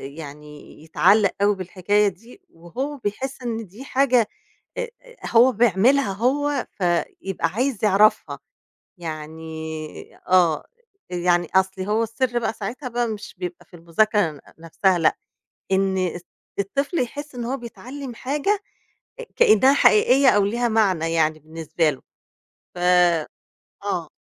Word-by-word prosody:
يعني 150 -1 -11
يتعلّق 200 +5 +3
أوي 205 0 +3
بالحكاية 195 +2 +1
دي، 225 - -8
وهو 255 - -6
بيحس 260 +4 -4
إن 225 -3 -4
دي 210 +9 -12
حاجة 255 -4 +2 0.5
آآ، - - -2 0.4
هو 240 +3 +6
بيعملها 235 +1 +3
هو، 275 +6 0
فيبقى 175 0 -1
عايز 230 +4 -2
يعرفها. 210 +1 +3 0.6
يعني 160 -1 -7
آه. 180 -4 +3 0.5
يعني 175 -1 +1
أصل 190 0 +2
هو 210 +4 0
السر 240 +2 -1
بقى 230 - -1
ساعتها 230 +5 -6
بقى 240 0 -1
مش 210 -2 -7
بيبقى 180 -1 -6
في 175 - -15
المذاكرة 175 +3 +1
ن 145 -2 -13 0.2
نفسها 175 +3 +1
لأ. 165 - +2 0.6
إن، 190 0 +2
إست 180 -1 -3 0.3
الطفل 275 - -1
يحس 285 +3 -4
إن 240 - -4
هو 260 +3 -2
بيتعلم 255 +2 -8
حاجة 295 - -1 0.6
آآ 485 - -8
كإنها 265 - +5
حقيقية 265 +2 +5
أو 205 -5 +4
ليها 235 +4 0
معنى 190 -8 +1
يعني 155 -1 +1
بالنسبة 160 +1 -1
له. 135 - -9 0.7
ف - - -9 1.1
آه. - - -2
205 Hz, 130 wpm, -22 LUFS, 175-245 Hz, 1.1 s, هو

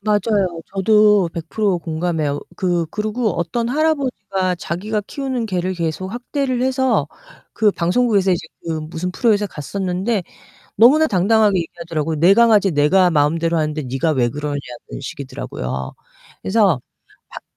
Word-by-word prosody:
맞아요. 205 -4 0
저도 210 -2 +4
100% 180 +3 -1
공감해요. 160 -3 -2 0.2
그 175 -2 0
그리고 215 +2 -1
어떤 185 +8 -2
할아버지가 245 - 0
자기가 210 +6 -3
키우는 260 -5 -3
개를 185 -1 -1
계속 175 +3 -3
학대를 255 +1 -2
해서 260 0 +1 0.5
그 215 -2 +3
방송국에서 195 +2 +1
이제 165 -1 -2 0.2
그 160 -1 -2
무슨 160 +3 -4
프로에서 210 +1 +1
갔었는데 190 - -2 0.5
너무나 285 +9 +6
당당하게 205 - +3
얘기하더라고요. 165 -2 -4
내 175 +5 +6
강아지 215 -3 +5
내가 175 +5 +3
마음대로 165 +2 +1
하는데 155 -1 -1
네가 135 +5 -1
왜 120 -4 +1
그러냐는 145 +2 -3 0.4
식이더라고요. 65 - -5 0.5
그래서 190 - +2 0.5
밖 - - -10
185 Hz, 335 characters per minute, -19 LUFS, 165-215 Hz, 0.5 s, 너무나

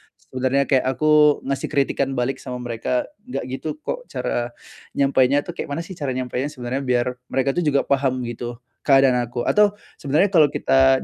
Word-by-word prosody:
sebenernya 130 +2 -1
kayak 130 -1 +2
aku 150 +1 +4
ngasih 135 0 -2
kritikan 135 -1 0
balik 125 +2 -1
sama 125 -1 -6
mereka, 120 +1 -1 0.2
"Gak 250 - -4
gitu 135 +4 -4
kok." - - -4
Cara 120 0 -3 0.4
nyampainya 140 0 +3
tuh, - - -6
kayak - - -6
mana 150 +4 -3
sih 180 - -12
cara 135 -3 -2
nyampainya 130 +1 -2
sebenernya 130 -3 -4
biar 125 -1 -1
mereka 135 +1 0
tuh 165 +2 -1
juga 140 -1 +3
paham, 135 -2 0
gitu, 120 0 -5 0.3
keadaan 135 -2 +5
aku. 120 0 -4
Atau 210 -1 +3 0.2
sebenernya 155 +8 +2
kalau 160 -5 +6
kita 135 -1 +3
135 Hz, 175 wpm, -22 LUFS, 125-145 Hz, 0.4 s, kalau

